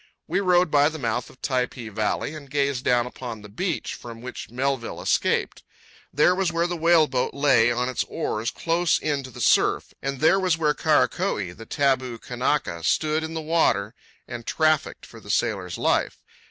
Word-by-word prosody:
We - - 0
rode 180 -3 +3
by 145 0 +5
the 160 - -7
mouth 120 -3 -2
of - - -18
Typee 125 -3 -2
valley 110 +7 -1
and 145 -3 -10
gazed 140 -2 0
down 120 -1 +2
upon 120 -3 -7
the 105 - -11
beach 170 - -3
from 115 -1 -9
which 125 +2 -8
Melville 130 0 -2
escaped. - - 0 0.5
There 150 +6 +4
was 185 -1 0
where 170 +1 +1
the 175 0 -2
whale 165 -1 +4
boat 130 -3 -2
lay 130 -5 +4
on 125 +1 0
its 130 - -1
oars 110 +2 -2
close 170 0 +1
in 145 -2 -1
to 130 - -9
the 125 - -12
surf; - - +2
and 135 -1 -3
there 160 +5 +4
was 185 -4 +1
where 150 -2 +2
Karakoee, 155 - +1
the 115 - -11
taboo 130 -4 0
Kanaka, 125 - -2
stood 155 - +1
in 160 +1 -5
the 160 - -2
water 125 -10 +1 0.3
and 120 -2 -8
trafficked 155 -2 +1
for - - -13
the - - -15
sailor's 90 -3 -1
life. - - 0
140 Hz, 185 wpm, -24 LUFS, 120-160 Hz, 0.5 s, by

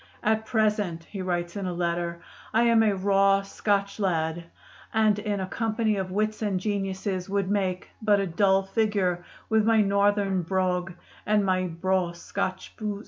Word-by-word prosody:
"At 220 0 +1
present," 210 -7 0
he 195 +3 -7
writes 175 -1 -2
in 200 -2 -3
a 180 - -2
letter, 170 0 -2 0.3
"I 230 - +5
am 230 -1 +5
a 210 -2 +3
raw 195 0 +3
Scotch 200 0 -1
lad, 170 -3 -1 0.5
and 215 -2 +3
in 205 -1 -2
a 190 - -2
company 220 +2 0
of 190 -1 -2
wits 215 +3 -1
and 200 -4 0
geniuses 195 -1 -2
would 200 -1 0
make 190 -3 -1
but 210 -2 +3
a 195 - 0
dull 195 +2 +2
figure 195 -4 0 0.2
with 220 -1 +3
my 225 0 +4
northern 200 -1 +2
brogue 180 0 -1 0.3
and 210 -1 +2
my 185 -1 +1
'braw 180 +1 0
Scotch 175 +2 -4
boos.'" 210 -3 -3
195 Hz, 165 wpm, -26 LUFS, 185-210 Hz, 0.5 s, I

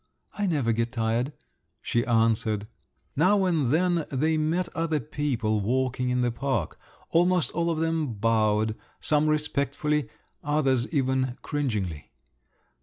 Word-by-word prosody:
"I 205 -1 -1
never 145 -9 +1
get 115 +1 -1
tired," 115 +3 0 0.5
she 120 - 0
answered. 110 -2 +2 0.5
Now 190 +6 +3
and 160 -8 +1
then 170 +2 +1
they 155 +4 +1
met 160 +4 0
other 165 -2 0
people 120 -5 -1
walking 125 +3 0
in 125 0 +1
the 120 -1 +1
park; 120 - -2 0.3
almost 175 0 +3
all 170 0 0
of 165 - 0
them 160 -5 0
bowed—some 110 +7 +1
respectfully, 150 0 0 0.3
others 135 -4 +1
even 130 -3 0
cringingly. 105 - -2
135 Hz, 120 wpm, -26 LUFS, 115-155 Hz, 0.5 s, Now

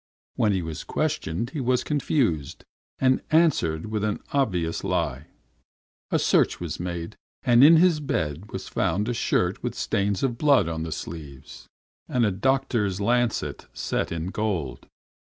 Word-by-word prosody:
When 105 - +2
he 95 -3 0
was 80 -1 -5
questioned 90 +10 -2
he 145 - -3
was 125 0 +1
confused, 130 - -1 0.3
and 130 -1 +2
answered 150 - +2
with 110 -1 -3
an 105 -1 -1
obvious 90 -12 0
lie. - - -1 0.8
A - - +2
search - - +2
was - - -5
made, 85 -1 -5 0.3
and 120 +1 +5
in 160 +3 +9
his 170 -2 +4
bed 85 - -3
was - - -6
found 105 +3 0
a 120 - 0
shirt - - 0
with - - -3
stains 100 +2 -1
of 120 -3 -1
blood 140 - +4
on 80 -1 -3
the 80 0 -4
sleeves, 75 -3 -8 0.4
and 125 -2 +1
a 105 - +2
doctor's 105 -2 0
lancet 120 +3 0
set - - -2
in 85 +2 -3
gold. 95 - -3
105 Hz, 150 wpm, -25 LUFS, 85-130 Hz, 0.8 s, in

